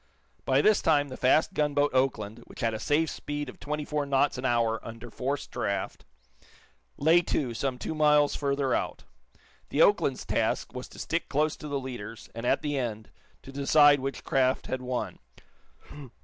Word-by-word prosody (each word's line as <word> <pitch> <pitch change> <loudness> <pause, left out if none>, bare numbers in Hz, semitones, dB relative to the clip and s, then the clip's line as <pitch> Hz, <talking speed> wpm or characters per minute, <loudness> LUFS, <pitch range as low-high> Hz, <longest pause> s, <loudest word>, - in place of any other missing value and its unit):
By 135 +2 +3
this 215 -1 +4
time 145 -3 +2
the 130 - -7
fast 155 +9 +3
gunboat 145 -3 +1
"Oakland," 120 -5 0
which - - -11
had 115 -1 +1
a 110 - -4
safe 155 +6 +1
speed 145 -2 -5
of - - -12
twenty 150 0 -4
four 150 0 -1
knots 140 +1 +2
an 130 - -4
hour, 115 -2 +1
under 115 +1 -9
forced 140 +2 -3
draught, 100 -1 -3 0.9
lay 160 +4 +5
to, 135 -7 -1
some 130 +2 -2
two 140 - -4
miles 150 -1 +4
further 140 -2 0
out. - - -2 0.7
The 150 - +4
"Oakland's" 145 -10 +2
task 110 +1 -1
was 125 0 -6
to - - -15
stick 170 +1 -2
close 150 +2 +1
to 150 - -8
the 140 -1 -2
leaders, 120 -4 -8
and, 115 +2 -4
at - - +2
the 145 -2 -1
end, 110 -4 -4 0.3
to 135 - -10
decide 145 +1 +5
which 135 +1 -4
craft 130 0 +1
had 130 - -3
won. 125 -1 -4
135 Hz, 175 wpm, -28 LUFS, 125-145 Hz, 0.9 s, lay